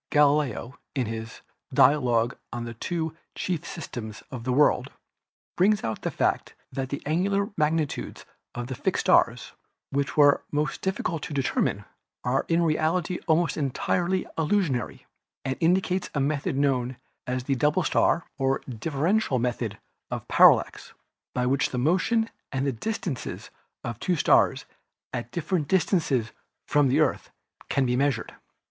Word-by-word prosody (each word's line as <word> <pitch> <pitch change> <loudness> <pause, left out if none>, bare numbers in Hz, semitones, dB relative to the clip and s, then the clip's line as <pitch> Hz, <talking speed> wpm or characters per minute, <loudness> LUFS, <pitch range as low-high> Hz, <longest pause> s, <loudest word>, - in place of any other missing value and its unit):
Galileo 145 -4 +2 0.2
in 130 -3 +1
his 115 +1 -6 0.3
"Dialogue 125 -4 +4 0.2
on 120 -1 -4
the 115 - -6
Two 160 +6 -3 0.2
Chief 175 -5 -2
Systems 110 -9 -7
of 120 -2 -6
the 130 - 0
World" 145 +3 +3 0.6
brings 200 +3 +3
out 110 -1 -3
the - - -1
fact - - -1 0.2
that 130 -1 -3
the 140 - -5
angular 195 +6 +1
magnitudes 155 -1 -1 0.3
of 120 - -3
the 130 - -5
fixed - - -1
stars, - - +3 0.4
which 140 +1 -1
were 145 -1 +6
the - - -7
most 150 +2 -1
difficult 190 -4 -2
to 145 - -5
determine, 135 - 0 0.4
are 130 +3 0
in 170 +1 +2
reality 165 +2 +1
almost 165 +1 +2
entirely 175 +6 0
illusory, 155 - 0 0.4
and 130 -1 -1
indicates 180 +2 +1
a - - +1
method 140 -1 0
known 130 -3 +1 0.3
as 125 0 -2
the 135 - 0
double 150 +7 +2
star 165 +2 +2
or 135 0 +1
differential 145 - 0
method 120 -3 -2 0.3
of - - -5
parallax - - +4 0.4
by 125 - +1
which 135 +2 +2
the 125 - -4
motion 185 - +2 0.2
and 135 0 -1
the 140 - +1
distances 160 - -4 0.3
of 120 -2 -5
two 180 - +1
stars 150 - +3 0.5
at 120 -1 -4
different 160 +1 -1
distances 160 - +1 0.4
from 145 -1 +3
the 135 +4 +2
Earth 155 - +1 0.4
can 135 - +2
be 125 0 +1
measured. 135 -3 0
145 Hz, 145 wpm, -26 LUFS, 125-165 Hz, 0.6 s, were